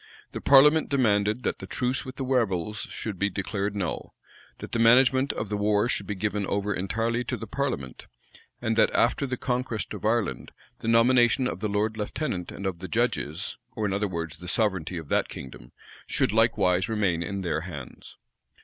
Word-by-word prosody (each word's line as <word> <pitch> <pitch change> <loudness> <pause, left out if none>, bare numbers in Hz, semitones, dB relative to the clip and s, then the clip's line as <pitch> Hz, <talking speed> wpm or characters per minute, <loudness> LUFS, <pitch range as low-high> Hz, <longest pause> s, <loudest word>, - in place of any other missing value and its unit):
The - - -6
parliament 150 +3 +6
demanded, 110 -3 +2
that - - -1
the - - -8
truce 125 +1 -1
with 130 0 -7
the 135 - -4
rebels 105 -6 0
should 105 -5 -4
be 100 - +2
declared 100 +1 -3
null; 95 -4 -4 0.4
that - - -9
the 115 - -1
management 130 +3 +5
of 105 - -4
the 105 - -1
war 105 +1 +2
should - - -1
be 105 - -3
given 105 +1 -1
over 100 0 -1
entirely 115 +6 -1
to - - -2
the - - -6
parliament; 115 - -4 0.5
and 115 0 -1
that, 110 - +5
after 135 +4 +2
the 125 -1 -3
conquest 125 -3 -2
of - - -8
Ireland, 105 - -1 0.3
the - - -6
nomination 120 +2 +4
of - - -4
the 110 - -2
lord 105 +2 0
lieutenant 105 - -3
and 100 - -7
of 95 -3 -2
the 95 - -6
judges, 100 -6 -1 0.2
or 110 - -1
in 100 - 0
other 100 +1 0
words 85 -3 -5
the 90 - -10
sovereignty 95 -4 0
of 80 -3 -7
that - - +1
kingdom, - - -10 0.4
should - - +1
likewise 105 -5 +2
remain 100 -6 +1
in 100 +2 -3
their 80 -3 -1
hands. 75 -7 -9
105 Hz, 190 wpm, -26 LUFS, 95-120 Hz, 0.5 s, parliament